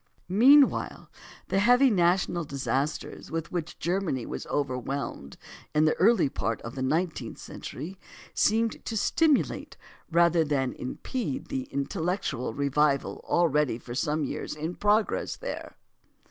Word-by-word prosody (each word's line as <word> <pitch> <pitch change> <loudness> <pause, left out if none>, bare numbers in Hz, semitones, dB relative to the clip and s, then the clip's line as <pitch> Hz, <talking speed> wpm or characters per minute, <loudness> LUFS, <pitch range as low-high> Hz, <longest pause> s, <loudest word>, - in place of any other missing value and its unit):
Meanwhile, 265 +10 +4 0.4
the 195 - +2
heavy 245 +5 +5
national 175 -2 +2
disasters 140 +1 -3
with 165 0 -4
which 175 -1 -4
Germany 175 -8 -1
was - - -6
overwhelmed 135 - -3 0.4
in 155 +1 +4
the 155 - +4
early 220 -1 +4
part 115 -4 -2
of 115 - -6
the 130 - -5
nineteenth 155 -3 -1
century 175 +8 -8 0.3
seemed 225 +2 +1
to 225 - -3
stimulate 305 +6 +1 0.3
rather 170 0 +4
than 140 -4 0
impede 260 - -4
the 265 -2 -3
intellectual 160 - -2
revival 140 0 +1
already 150 -7 +2
for 120 0 -9
some 150 +4 0
years 140 - -4
in 160 +3 -4
progress 210 +3 +1
there. - - -7
165 Hz, 125 wpm, -27 LUFS, 140-200 Hz, 0.4 s, heavy